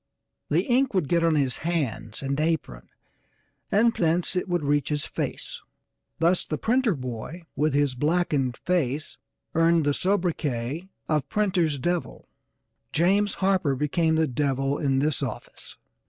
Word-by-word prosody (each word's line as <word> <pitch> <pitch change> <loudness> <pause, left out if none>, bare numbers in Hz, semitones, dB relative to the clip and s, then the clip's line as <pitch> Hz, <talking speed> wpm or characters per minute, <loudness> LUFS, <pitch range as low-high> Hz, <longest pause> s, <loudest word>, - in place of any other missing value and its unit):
The - - +2
ink 260 -3 +1
would 180 -7 +1
get 170 +3 +2
on 165 -1 +3
his 135 -4 +1
hands 130 -10 -3
and 140 +1 -1
apron, 155 - -2 0.8
and 230 +3 +4
thence 170 0 +1
it 180 +1 -1
would 175 -3 0
reach 145 0 +1
his 150 -1 -1
face - - -4 0.6
thus 170 +3 +2
the 155 - -3
printer 235 - +2
boy 130 +6 -6
with 150 +1 +1
his 145 -2 +2
blackened 145 -3 0
face 155 -5 -1 0.3
earned 165 -1 +3
the 145 - +2
sobriquet 165 -5 -1 0.2
of 150 -3 0
'printer's 180 -8 +1
devil.' 175 +5 -3 0.6
James 195 +5 +2
Harper 185 -8 +2
became 160 +4 +1
the 160 0 +3
'devil' 135 0 0
in 135 -4 +1
this 145 0 +1
office. - - -7
155 Hz, 140 wpm, -26 LUFS, 140-175 Hz, 0.8 s, and